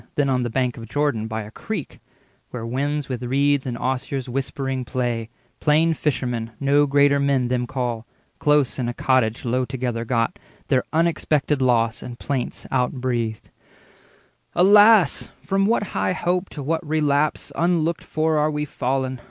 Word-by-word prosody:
Then 145 -2 +1
on 130 -1 +1
the 120 - -1
bank 125 0 -1
of 115 -1 -8
Jordan, 145 -7 0
by 110 0 -4
a 105 - -11
creek, 195 - -6 0.5
Where 120 -2 -6
winds 140 +4 -2
with 125 -2 -4
reeds 140 +2 +1
and 120 -2 -3
osiers 130 +1 -2
whispering 135 0 -3
play, 120 -3 -2 0.3
Plain 160 +2 +3
fishermen 125 -6 -2
(no 145 +1 +3
greater 140 0 +4
men 135 -3 +1
them 125 -1 0
call), 120 -3 -3 0.3
Close 150 -3 +2
in 120 -2 -1
a 120 - -5
cottage 130 -1 +1
low 125 +2 +1
together 125 -2 -3
got, 120 - -1 0.3
Their 130 -3 +3
unexpected 155 -3 +1
loss 115 -3 +2
and 120 -1 -8
plaints 135 -2 -3
outbreathed:— 125 -3 -1 1.0
"Alas, 205 -1 +6 0.2
from 195 0 +2
what 225 -1 +2
high - - 0
hope 180 +1 -1
to 145 - -7
what 160 +3 -1
relapse 150 -1 0
30 - - -1
Unlooked 170 -1 +1
for 155 0 0
are 150 +1 +2
we 150 0 -2
fallen! 130 -2 -2
135 Hz, 160 wpm, -22 LUFS, 125-150 Hz, 1.0 s, Alas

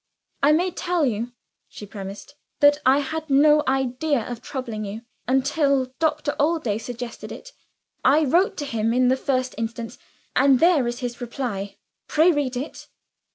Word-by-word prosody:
"I 285 - +5
may 355 +4 +2
tell 350 -2 0
you," 235 0 -2 0.4
she 210 - -10
premised, 200 +5 -9 0.3
"that 290 0 +5
I 270 +2 +5
had 315 +2 -5
no 300 +2 +5
idea 265 +1 0
of 240 -2 -6
troubling 235 -6 -5
you, 210 +3 -6 0.2
until 270 0 +1
Doctor 305 -2 0
Allday 290 -9 +1
suggested 240 0 -7
it. - - -10 0.5
I 295 +4 +5
wrote 350 +8 +2
to 290 - -3
him 230 -3 -1
in 250 0 +4
the 260 - +4
first 255 -1 -1
instance; 230 0 -5 0.4
and 270 -1 +5
there 325 -7 +4
is 240 +1 -4
his 245 0 -5
reply. 235 -5 -4 0.3
Pray 320 +4 +4
read 280 -5 -1
it." 270 +5 -6
265 Hz, 155 wpm, -23 LUFS, 240-300 Hz, 0.5 s, I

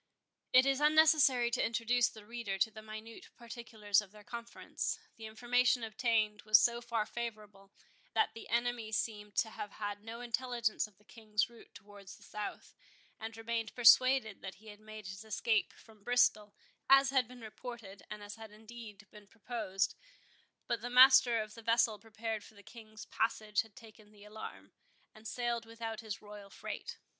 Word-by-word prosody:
It 255 +1 +7
is 275 +1 +1
unnecessary 300 -5 +5
to - - +1
introduce 230 +1 +2
the 215 -2 -13
reader 230 -3 -4
to 220 +3 +2
the 215 - -10
minute 215 +1 -10
particulars 225 -4 -1
of 200 -2 -14
their 210 0 -15
conference. 235 +1 -4 0.2
The 220 -1 -8
information 245 +2 +2
obtained 220 -1 0
was 215 -1 +7
so 235 +2 +2
far 235 -3 -1
favourable, 210 -4 -7 0.4
that 440 - +2
the 225 - -10
enemy 235 -1 0
seemed 210 -2 -3
to 220 - +1
have 205 - -7
had 205 -1 -5
no 230 +2 -7
intelligence 240 -2 -1
of 205 -3 -25
the 210 - -26
King's 215 0 -2
route 235 - -17
towards 200 -2 -12
the - - -18
south, 210 -1 -7 0.5
and 225 0 -7
remained 225 -1 -3
persuaded 245 -2 +6
that 190 0 -7
he 215 +2 -15
had 205 0 -12
made 215 -1 -10
his 190 +2 -7
escape 220 0 0
from 220 -2 -19
Bristol, 215 -3 +2 0.3
as 275 0 +7
had 260 -3 +2
been 250 0 -13
reported, 220 -3 -9
and 210 -1 -7
as 205 +1 -8
had 220 -1 -10
indeed 215 -1 -11
been 210 -1 -14
proposed; 210 -3 -2 0.7
but 235 -2 -2
the 245 - -4
master 250 -2 +7
of 215 0 -12
the 230 - -11
vessel 230 -1 +2
prepared 220 0 -5
for 220 - -16
the 205 - -15
King's 215 -2 -12
passage 215 -2 0
had 220 -2 -16
taken 215 -2 -15
the 205 -1 -17
alarm, 215 +1 -9 0.4
and 215 +1 -11
sailed 235 -1 -2
without 225 -1 -6
his 215 -3 -6
royal 205 -1 -11
freight. - - -7
220 Hz, 175 wpm, -34 LUFS, 210-235 Hz, 0.7 s, It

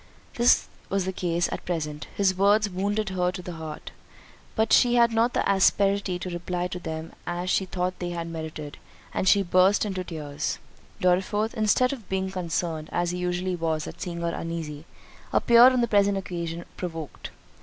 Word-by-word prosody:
This 240 +1 +4 0.2
was 195 -1 0
the 190 - -2
case 175 -1 0
at - - -4
present—his 170 +4 -1
words 205 +3 +4
wounded 200 +3 -1
her 180 -1 0
to 185 - -6
the 180 - -6
heart, 160 -2 -7 0.6
but 220 0 +2
she 245 0 +5
had 235 -1 +5
not 230 +2 +2
the - - +1
asperity 195 -1 +3
to 180 +1 -5
reply 175 +1 -2
to 180 - -5
them 160 -1 -6
as 175 +1 -2
she 190 - +2
thought 180 0 -2
they 175 -1 -3
merited, 160 -3 -7 0.3
and 190 - -1
she 200 -1 +5
burst 185 +3 +4
into 190 -3 -3
tears. 150 -4 -4 0.4
Dorriforth, 195 +5 +1
instead 250 +3 +2
of 235 -8 -10
being 190 0 -1
concerned, 165 -3 -3
as 175 0 0
he 180 - -4
usually 180 +1 -1
was 160 -2 -1
at - - -9
seeing 170 -2 -4
her 170 0 -1
uneasy, 160 -2 -5 0.5
appeared 240 +2 +7
on 255 -1 +2
the 235 - +2
present 200 -2 +3
occasion 170 -3 -4
provoked. 165 -4 -6
180 Hz, 175 wpm, -26 LUFS, 170-200 Hz, 0.6 s, appeared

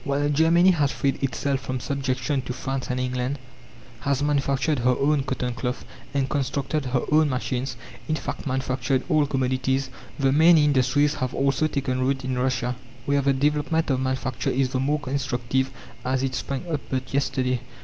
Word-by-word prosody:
While 145 +1 0
Germany 165 +5 +5
has 150 -5 +2
freed 140 -2 -1
herself 135 +1 0
from 130 -1 -4
subjection 135 0 -1
to 125 - -2
France 135 +1 -4
and 125 0 -1
England, 125 +2 -1 0.6
has 140 +1 0
manufactured 140 0 +1
her 125 +1 +3
own 145 0 +3
cotton 130 -2 -2
cloth, 125 +1 -3 0.3
and 135 -1 0
constructed 140 +1 -1
her 125 -1 +1
own 155 0 +5
machines 130 0 -2 0.3
in 155 - +2
fact, 150 - -5
manufactured 130 0 0
all 155 -3 +3
commodities 130 0 0 0.3
the 135 -2 +2
main 160 +4 +6
industries 145 0 +3
have 130 -1 -1
also 140 +2 +2
taken 135 -4 -1
root 130 0 0
in 130 -1 -1
Russia, 125 -1 0 0.3
where 140 0 +2
the 140 0 +3
development 150 +3 +1
of 130 - +1
manufacture 130 -1 -1
is 130 0 +1
the 130 - -1
more 145 +3 +1
instructive 130 -1 -1 0.3
as 130 +1 0
it 135 -1 -1
sprang 135 +5 -3
up 155 -4 -2
but 130 -1 -3
yesterday. 130 -2 +1
135 Hz, 170 wpm, -25 LUFS, 130-145 Hz, 0.6 s, main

